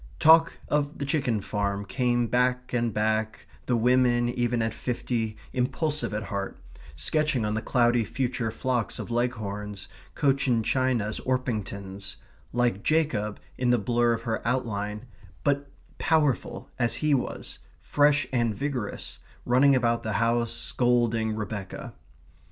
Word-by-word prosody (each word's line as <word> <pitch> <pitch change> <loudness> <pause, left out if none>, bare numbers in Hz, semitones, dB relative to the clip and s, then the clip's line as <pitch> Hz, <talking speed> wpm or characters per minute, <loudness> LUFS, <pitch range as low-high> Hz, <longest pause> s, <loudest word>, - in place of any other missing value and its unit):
Talk 165 +1 +6
of 145 0 0
the 140 - -3
chicken 135 -7 0
farm 100 0 -2
came 120 +3 +1
back 125 +2 0
and 120 -1 +1
back, 110 +1 -1 0.2
the 125 - +2
women, 120 0 +3
even 120 -1 0
at 110 -1 -1
fifty, 115 -2 -2 0.2
impulsive 145 +4 0
at 105 0 -2
heart, 100 -2 -4 0.4
sketching 140 - +1
on 105 - -1
the 110 - -1
cloudy 120 -1 +3
future 120 +1 -2
flocks 120 -1 -1
of - - -6
Leghorns, 105 -4 -3 0.3
Cochin 135 -5 +2
Chinas, 120 -4 0
Orpingtons; 100 -6 -3 0.4
like 120 -5 +1
Jacob 120 -10 0 0.2
in 125 -1 +2
the 120 - +5
blur 120 +2 +2
of 115 - -4
her 115 -1 -2
outline; 105 -3 -2 0.4
but 140 0 +1 0.3
powerful 150 -6 +1
as 120 -1 +1
he 150 -1 +1
was; 130 - -3 0.2
fresh 145 0 +3
and 120 -4 +1
vigorous, 130 -4 -4 0.3
running 135 +3 +5
about 115 -2 +2
the 110 - -3
house, 115 +1 +1
scolding 115 -3 +1
Rebecca. 105 -2 -5
120 Hz, 135 wpm, -27 LUFS, 110-130 Hz, 0.4 s, Talk